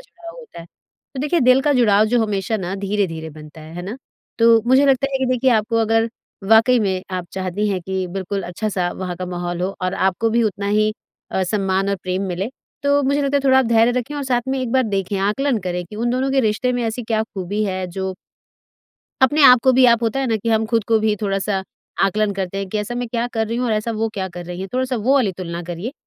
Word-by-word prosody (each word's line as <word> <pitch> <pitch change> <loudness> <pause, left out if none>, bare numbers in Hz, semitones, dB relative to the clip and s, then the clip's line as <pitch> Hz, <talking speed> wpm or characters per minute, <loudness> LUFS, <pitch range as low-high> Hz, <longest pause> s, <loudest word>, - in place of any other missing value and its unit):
जुड़ाव 340 +6 -11
होता 455 - -12
है। 165 - -11 0.5
तो 265 - -4
देखिए, 300 +4 +1
दिल 255 +1 +5
का 295 - +2
जुड़ाव 215 -5 +4
जो 235 +1 +2
हमेशा 205 +1 -1
ना 190 -1 -4
धीरे-धीरे 190 -5 -2
बनता 155 +1 -12
है। 155 +2 -11
है 175 - -5
ना? 205 +7 -6 0.4
तो 230 -1 +6
मुझे 260 +3 +5
लगता 275 0 +3
है 270 - 0
कि 265 - 0
देखिए, 255 +1 +2
आपको 225 0 +1
अगर 225 0 +2 0.4
वाक़ई 225 +3 +5
में 190 -3 -1
आप 180 -1 -4
चाहती 190 +2 -2
हैं 190 -2 -1
कि 190 0 -3
बिल्कुल 195 +2 -4
अच्छा-सा 180 0 -2
वहाँ 180 -2 -5
का 185 +1 -5
माहौल 175 -1 -4
हो 195 +2 -2
और 185 +1 -1
आपको 190 +4 +1
भी 235 +1 +2
उतना 200 -2 -2
ही 215 +1 +2 0.4
अ, 190 - 0
सम्मान 195 0 0
और 200 - 0
प्रेम 185 +1 -2
मिले, 185 +4 -3 0.3
तो 285 0 +3
मुझे 280 +2 +1
लगता 280 0 +1
है - - +2
थोड़ा 265 -1 +5
आप 265 - +3
धैर्य 230 +1 +4
रखें 260 +5 -5
और 285 - -3
साथ 250 -2 +1
में 265 0 0
एक 250 -2 -3
बार 260 0 +4
देखें, 200 -2 -2
आकलन 225 +6 0
करें 180 0 -2
कि 210 - -10
उन 240 +2 -1
दोनों 260 +2 0
के 270 0 +3
रिश्ते 235 +2 0
में 245 -1 -1
ऐसी 225 +2 -3
क्या 220 -1 0
खूबी 205 0 -4
है 185 -2 -2
जो 190 +1 -4 1.1
अपने 290 +3 +4
आप 250 -2 +8
को 260 - +5
भी 255 0 +5
आप 235 0 +4
होता 230 +4 0
है 270 - 0
ना 225 -2 +1
कि 230 +2 -4
हम 220 0 +2
खुद 225 -1 0
को 225 -1 +4
भी 215 -1 +2
थोड़ा-सा 195 -1 -1 0.4
आकलन 205 +1 +1
करते 195 0 -4
हैं 195 - -4
कि, 215 - -2
"ऐसा 210 +3 -4
मैं 245 0 -2
क्या 235 0 -1
कर 220 -1 0
रही 230 +2 -3
हूँ 250 - -1
और 225 - 0
ऐसा 215 +2 -1
वो 225 0 -1
क्या 190 -1 -3
कर 175 0 -6
रही 180 +1 -6
हैं?" 195 - -5
थोड़ा-सा 255 0 0
वो 245 +6 +2
वाली 240 -9 +2
तुलना 170 -1 -5
करिए। 175 +8 -5
215 Hz, 250 wpm, -20 LUFS, 190-245 Hz, 1.1 s, आप